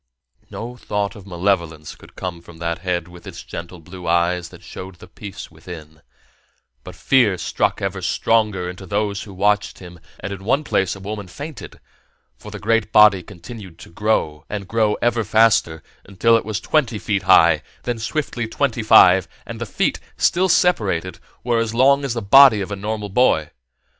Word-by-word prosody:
No 120 +2 -7
thought 105 -2 -3
of 100 -2 -13
malevolence 85 -4 -2
could - - -18
come 90 -2 -6
from 85 -1 -15
that 85 0 -3
head 90 -2 -2
with 90 0 -14
its - - -9
gentle 85 +1 -8
blue 90 +2 -10
eyes 85 +1 +1
that - - -15
showed 95 0 -9
the 85 - -14
peace 100 -5 -10
within, 80 -1 -12 0.8
but 90 - -10
fear 110 +1 +2
struck 85 - -1
ever - - -3
stronger 105 -5 0
into 90 +1 -8
those 100 +1 -1
who 100 - -10
watched 105 +2 0
him, 90 -2 -12 0.2
and 100 +2 -5
in 95 -1 -9
one 135 +8 +1
place 95 - 0
a - - -11
woman 100 0 -6
fainted; 145 - -9 0.6
for - - -12
the - - -7
great 115 0 0
body 105 -3 +6
continued 95 0 -11
to - - -13
grow, 85 -6 -1
and 100 -2 -5
grow 110 -1 +1
ever 120 -1 +1
faster, 105 -7 +2 0.2
until 100 +4 +2
it 115 - 0
was 110 -1 -3
twenty 120 -2 0
feet 100 -1 -1
high, 95 - +5 0.2
then 120 -2 -3
swiftly 120 -1 -3
twenty 120 0 -1
five, 95 -4 +6 0.2
and - - -8
the - - -3
feet, - - -1 0.2
still 185 +2 +2
separated, 95 - +1 0.2
were 120 -1 +1
as 115 0 -2
long 140 +3 +4
as 135 -4 -2
the 115 - -3
body 130 +1 +7
of 100 +1 -5
a - - -2
normal 105 +1 -4
boy. 95 -8 +2
100 Hz, 180 wpm, -20 LUFS, 90-115 Hz, 0.8 s, body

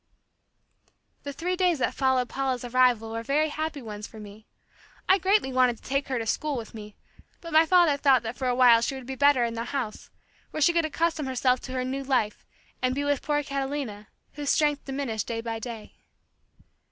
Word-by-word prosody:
The 285 - -6
three 350 +6 -2
days 360 -3 +2
that 260 - 0
followed 260 -2 +1
Paula's 260 -2 -2
arrival 245 -2 +2
were 230 0 -3
very 295 +6 +1
happy 310 -2 -4
ones 210 -1 -7
for 220 - -13
me. 210 +1 -12 0.6
I 380 +1 +5
greatly 380 -7 +2
wanted 250 -2 +3
to - - -23
take 275 +1 -1
her 260 -1 -1
to 225 - -3
school 290 +5 -1
with 225 -2 -7
me, 210 -2 -10 0.4
but 335 -2 -9
my 320 +1 +6
father 345 -5 +4
thought 270 -4 +4
that 225 +2 -5
for 260 - -3
a 250 - +1
while 245 -2 +6
she 270 +4 -1
would 260 -2 -8
be 265 - -5
better 280 -1 +4
in 230 - -3
the 230 0 -4
house, 245 -6 -4 0.4
where - - -5
she 340 +4 +5
could 335 -1 +2
accustom 320 -1 -1
herself 255 -1 +1
to 255 - -9
her 255 -1 -1
new 270 +2 -3
life 255 -6 -1 0.3
and 255 0 +1
be 285 - -1
with 285 -1 0
poor 295 -1 0
Catalina 270 -6 -4 0.3
whose 290 -1 -4
strength 295 -2 +1
diminished 265 -6 -3
day 230 -1 -3
by 230 -1 -4
day. 225 -2 -8
265 Hz, 205 wpm, -26 LUFS, 235-290 Hz, 0.6 s, my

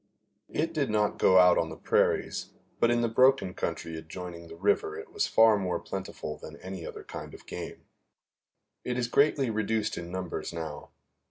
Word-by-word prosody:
It 165 +2 -1
did 145 -5 0
not 105 -1 +1
go 95 - +6
out 90 -1 +7
on 80 - 0
the 80 - -8
prairies, - - +1 0.3
but 120 - +4
in 120 0 +3
the 120 - +2
broken 115 -5 +4
country 80 - -3
adjoining 85 +1 -8
the 80 - -10
river 105 - +1
it 430 +1 -10
was 415 - +1
far 110 -1 +6
more 90 -2 -1
plentiful 75 0 -6
than 80 - -9
any 95 -2 -7
other - - -8
kind - - -8
of - - -15
game. - - -7 1.0
It 125 0 -2
is 125 - +1
greatly 140 -1 +3
reduced 110 -2 -1
in 85 0 -7
numbers 95 -2 -4
now. 80 -3 -6
100 Hz, 180 wpm, -29 LUFS, 85-120 Hz, 1.0 s, out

